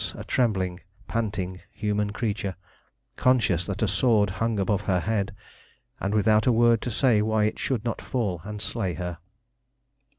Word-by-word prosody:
a - - -6
trembling, 95 -7 0 0.3
panting 95 -5 -2
human 105 -1 -1
creature, 105 -3 -2 0.6
conscious 105 -9 +2
that 100 0 -2
a - - +3
sword 110 -6 +3
hung 115 -1 +1
above 100 0 +1
her 90 -3 +2
head, 105 -2 -1 0.7
and 100 +2 -1
without 110 +2 +3
a - - +6
word 115 -1 +4
to - - -3
say 115 -2 +3
why 110 0 +2
it 105 - 0
should 125 -4 -1
not 115 - -2
fall 100 -10 -2
and 105 +1 -5
slay 95 -8 -2
her. 90 -1 -5
105 Hz, 160 wpm, -26 LUFS, 95-115 Hz, 0.7 s, a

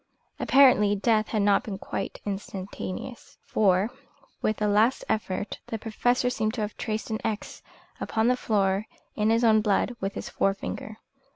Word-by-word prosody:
Apparently 250 -7 +5
death 215 +1 +2
had 215 -3 0
not 200 -1 +4
been 200 -3 -5
quite 195 - -5
instantaneous, 195 +3 -6
for 195 +1 +2 0.5
with 215 - 0
a 210 - +1
last 215 +5 +3
effort 210 -2 -2
the 225 - -3
Professor 245 +3 0
seemed 220 -2 -1
to 225 - -2
have 210 0 -3
traced 220 +1 -3
an 220 - -1
X 215 -2 -4 0.4
upon 220 +1 0
the 250 - +4
floor 200 -3 0 0.3
in 215 0 +1
his 230 +1 +3
own 220 -2 +5
blood 215 +3 +1
with 195 +1 -2
his - - -5
forefinger. 200 +2 -2
215 Hz, 160 wpm, -27 LUFS, 200-225 Hz, 0.5 s, Apparently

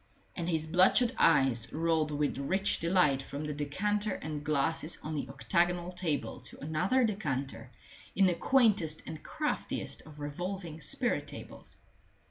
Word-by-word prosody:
And 170 -1 -3
his 160 -2 0
bloodshot 185 +9 +4
eyes 135 -7 +3
rolled 160 -1 +1
with 150 -1 -1
rich 190 +8 +1
delight 165 -6 +3
from 140 +2 -6
the 150 - -3
decanter 205 +8 -1
and 150 -1 -5
glasses 155 +2 0
on 155 - -4
the 145 - -3
octagonal 175 +5 0
table 175 -5 -2
to - - -11
another 160 - +1
decanter 135 - -2 0.5
in 195 - +5
the 180 - +3
quaintest 205 - +3
and 155 - -7
craftiest 310 -1 -3
of 150 -1 -13
revolving 165 +2 -5
spirit - - 0
tables. - - -10
160 Hz, 140 wpm, -31 LUFS, 145-185 Hz, 0.5 s, in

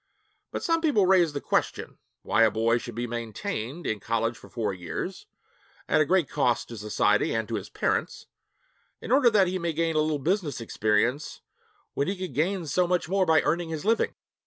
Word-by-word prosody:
But - - -5
some 330 -2 +1
people 280 - +3
raise 180 -4 +4
the 145 - -2
question - - -2 0.2
why - - +2
a 115 - +6
boy 115 +3 +1
should 120 -1 -8
be 120 +1 -2
maintained 120 +5 -5
in 110 - -1
college 115 +1 -1
for - - -15
four 110 -4 -2
years, 95 - -6 0.6
at 155 - +3
a - - +3
great 180 -1 +2
cost 125 -5 0
to 115 - -7
society 105 +1 +1
and 110 -1 -1
to 115 - -6
his 105 -4 -4
parents, - - -2 0.7
in - - -7
order 260 -2 +6
that 210 -4 +4
he 185 +1 -2
may 170 -1 -2
gain 165 +1 0
a - - +3
little 155 0 +1
business 165 -1 -1
experience 115 +4 0 0.5
when 140 - -1
he 195 - -2
could 185 -6 -5
gain 175 +6 0
so 180 +4 +1
much 180 -2 0
more 190 +1 +1
by 160 -1 +4
earning 165 +2 0
his 160 0 -5
living. 225 +1 +1
155 Hz, 200 wpm, -27 LUFS, 115-180 Hz, 0.7 s, a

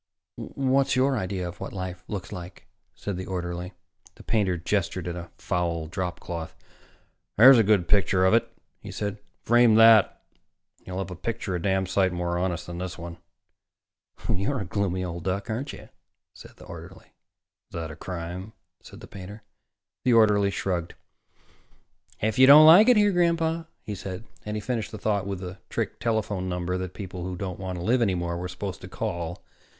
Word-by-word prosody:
"What's 135 0 0
your 135 +1 +3
idea 95 -4 -3
of 85 0 -9
what - - -6
life 90 -1 -5
looks 100 -4 -5
like?" 90 -3 -9 0.3
said 100 -3 -5
the 95 - -6
orderly. 90 0 -4 0.4
The - - -14
painter 95 -5 +1
gestured 90 0 -2
at 85 - -3
a 85 -1 -7
foul 85 -3 -2
dropcloth. 90 -2 -5 0.8
"There's 125 +3 +9
a - - +5
good 100 -4 +3
picture 95 -1 +3
of 95 - +4
it," 115 - +2 0.3
he - - -10
said. 105 0 -4 0.2
"Frame 120 -1 +5
that, 115 -2 +6 0.6
and - - -31
you'll 90 0 -5
have 95 -1 -4
a - - -5
picture 100 +1 -4
a 90 - -2
damn 95 0 +1
sight 95 0 +1
more 85 0 -2
honest 90 -2 -2
than 85 0 -7
this 90 0 -5
one." 85 0 -8 1.1
"You're 115 +7 0
a - - -4
gloomy 95 +1 -1
old 85 -1 -6
duck, 95 +3 -2
aren't 130 +6 -3
you?" - - -12 0.4
said - - -14
the - - -13
orderly. - - -11 0.6
"Is - - -27
that 80 -1 -4
a - - -9
crime?" 90 +5 -6 0.3
said - - -13
the - - -10
painter. 100 +2 -10 0.6
The 125 - +3
orderly 105 -3 +5
shrugged. 90 -3 -3 1.2
"If 110 +2 -1
you 130 - +8
don't 150 +3 +10
like 185 +9 +9
it 245 - +6
here, 205 -1 +4
Grandpa 170 -2 +1
" - - -48
he 105 - -4
said, 95 0 -6 0.2
and 105 0 -2
he - - -4
finished 115 -1 -3
the 110 - -6
thought 100 -2 -1
with 100 -2 -4
the 90 0 -7
trick - - -3
telephone 105 -5 -1
number 90 0 -2
that 95 0 -6
people 95 -3 -7
who 90 0 -4
didn't 90 -2 -5
want 95 -1 -4
to 85 - -5
live 120 +2 +3
any 100 -5 +2
more 85 -1 -2
were 90 +1 -4
supposed 90 +1 -6
to 95 - -8
call. 85 -5 -4
95 Hz, 190 wpm, -26 LUFS, 90-110 Hz, 1.2 s, don't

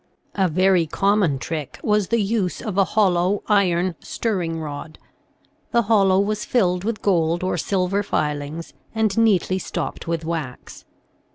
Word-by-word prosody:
A 190 -2 +2
very 180 0 +3
common 190 -2 +2
trick 150 0 -5
was 210 -2 +2
the 230 - +1
use 200 -3 -1
of 210 -4 -5
a 195 - +5
hollow, 190 -1 +1
iron 185 -3 +2
stirring 175 -8 -2
rod; 155 +1 -7 0.7
the 235 0 +2
hollow 195 -3 +4
was 210 +1 0
filled 180 -7 +1
with 220 +1 -3
gold 170 -3 +1
or 185 - 0
silver 195 +1 0
filings, 150 -1 -3 0.2
and 220 -3 +1
neatly 200 -5 +2
stopped - - -5
with 165 -1 -2
wax. 160 -7 -6
185 Hz, 145 wpm, -22 LUFS, 165-205 Hz, 0.7 s, a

